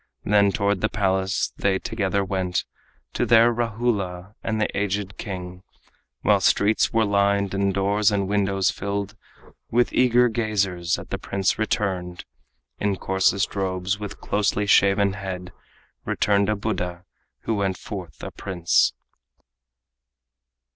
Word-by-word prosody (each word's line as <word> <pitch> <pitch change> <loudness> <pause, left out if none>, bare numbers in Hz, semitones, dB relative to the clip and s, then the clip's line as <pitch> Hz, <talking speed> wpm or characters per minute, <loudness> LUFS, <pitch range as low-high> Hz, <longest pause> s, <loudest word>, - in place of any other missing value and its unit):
Then 100 -1 +4
toward 100 -1 0
the 110 - +1
palace 95 -2 0
they 100 -1 +1
together 100 -2 -1
went 95 -2 -1 0.5
To - - 0
their 115 +1 +5
Rahula 105 -5 -2
and 110 -1 -1
the 110 - -1
aged 100 0 -2
king, 90 -2 -6 0.6
While - - +4
streets 105 +2 +3
were 115 -1 +2
lined 100 -1 +1
and 100 0 +1
doors 100 +2 +2
and 100 -2 0
windows 100 -1 +1
filled 100 +1 -4 0.5
With 120 +1 +2
eager 125 -1 +4
gazers 100 -7 0
at - - -10
the - - -2
prince 95 +1 -1
returned 95 -5 -2 0.5
In 100 -1 0
coarsest 95 +1 +1
robes, 95 0 -1
with 105 -1 -7
closely 105 0 0
shaven 100 0 +4
head, 95 -2 -6 0.5
Returned 100 0 +1
a 105 - +2
Buddha 90 -4 -3 0.4
who 115 - -2
went 100 -3 -1
forth 90 -10 -8
a - - -5
prince. 85 -3 +1
100 Hz, 130 wpm, -24 LUFS, 95-105 Hz, 0.6 s, their